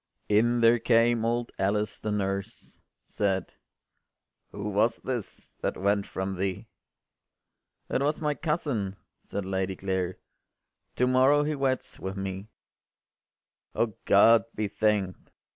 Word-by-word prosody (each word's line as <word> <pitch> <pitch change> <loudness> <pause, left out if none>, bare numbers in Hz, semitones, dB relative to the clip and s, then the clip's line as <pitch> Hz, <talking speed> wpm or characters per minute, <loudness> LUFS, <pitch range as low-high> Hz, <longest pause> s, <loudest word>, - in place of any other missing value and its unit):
In 120 +3 +3
there 115 +1 +5
came 115 0 +3
old 120 +1 -1
Alice 105 +2 0
the 110 - -3
nurse, 100 +2 -3 0.3
Said, 95 -3 -1 1.0
“Who 105 +1 -4
was 110 +3 +2
this 125 -6 -6
that - - -1
went 100 +1 +1
from 95 0 -4
thee?” 95 0 -2 1.2
“It - - 0
was 150 +2 +1
my 150 -1 0
cousin,” 145 - -2 0.3
said 100 - -5
Lady 95 0 -1
Clare, 95 -2 -2 0.8
“To 125 - +2
morrow 130 +3 +4
he 155 +1 -1
weds 135 -2 -2
with 95 +1 -5
me.” 95 +1 -5 1.3
“O 115 -2 +1
God 115 +3 +6
be 105 -1 -1
thank’d! 100 -3 -1
105 Hz, 125 wpm, -28 LUFS, 95-120 Hz, 1.3 s, God